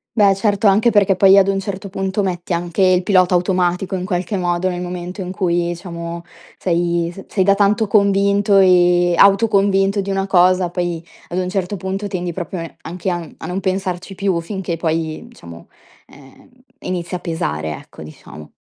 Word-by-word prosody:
Beh, 200 -3 +5
certo. 205 +1 0
Anche 210 +4 +4
perché 200 -3 +3
poi, 195 +1 +6
ad 195 0 +5
un 195 0 0
certo 195 0 -5
punto, 195 +1 -2
metti 180 -1 -4
anche 175 +1 -2
il 185 -1 +4
pilota 185 -2 +3
automatico 180 +1 0
in 180 - -3
qualche 185 +1 -2
modo 175 0 -1
nel 180 -1 -3
momento 180 +2 -6
in 180 - -5
cui, 175 -2 0
diciamo, 170 -1 -6 0.3
sei 170 -1 0
s 195 - -11
sei 190 - 0
da 200 +1 +4
tanto 210 +2 +2
convinto 200 0 +3
e 175 -2 +4
autoconvinto 200 0 +3
di 195 - -6
una 195 0 -1
cosa 185 -1 +3
poi, 175 -2 -3 0.2
ad 175 - -4
un 180 -1 -1
certo 195 +1 -3
punto, 190 +3 -4
tendi 180 -3 -4
proprio 175 0 -5
e 165 - -9
anche 180 +2 -5
a 175 - -1
n 165 - -11
a - - -9
non 185 +2 -3
pensarci 190 -1 -3
più 185 -3 -1
finché 185 -1 -4
poi, 160 -1 -3
diciamo, 85 0 -13 0.4
ehm, 135 -1 -18 0.3
inizia 180 0 -4
a - - -13
pesare, 80 - -3
ecco, - - -14
diciamo. 75 0 -12
185 Hz, 185 wpm, -18 LUFS, 175-195 Hz, 0.4 s, poi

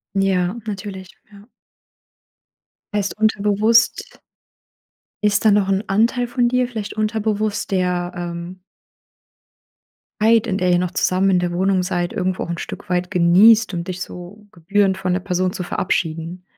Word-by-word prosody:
Ja, 190 0 +1
natürlich, 195 -2 -6 0.2
ja. 200 0 -15 1.5
Heißt 200 -1 -1
unterbewusst 215 +1 +2 1.0
ist 200 -1 +2
da - - +7
noch 200 -1 +2
'n 195 +1 +1
Anteil 230 +5 +1
von 240 0 +1
dir, 250 0 +1
vielleicht 215 -4 -6
unterbewusst, 215 -1 -2
der, 180 -2 -1
ähm 175 +1 -6 1.6
Zeit, 225 0 +4
in 190 - -1
der 180 -1 +1
ihr 175 - +4
noch 180 -1 -2
zusammen 190 +1 +1
in 185 - +3
der 175 -1 -1
Wohnung 190 +1 +1
seid, 175 -1 -2
irgendwo 185 0 -2
auch - - -10
'n 170 - -3
Stück - - -8
weit 180 0 -1
genießt, 190 +5 +5
um 170 - -2
dich 185 0 -6
so 190 +3 -9
gebührend 190 +2 +1
von 185 -1 -2
der 180 - 0
Person 185 -1 -1
zu 185 - -5
verabschieden. 170 0 -3
190 Hz, 150 wpm, -20 LUFS, 180-210 Hz, 1.6 s, da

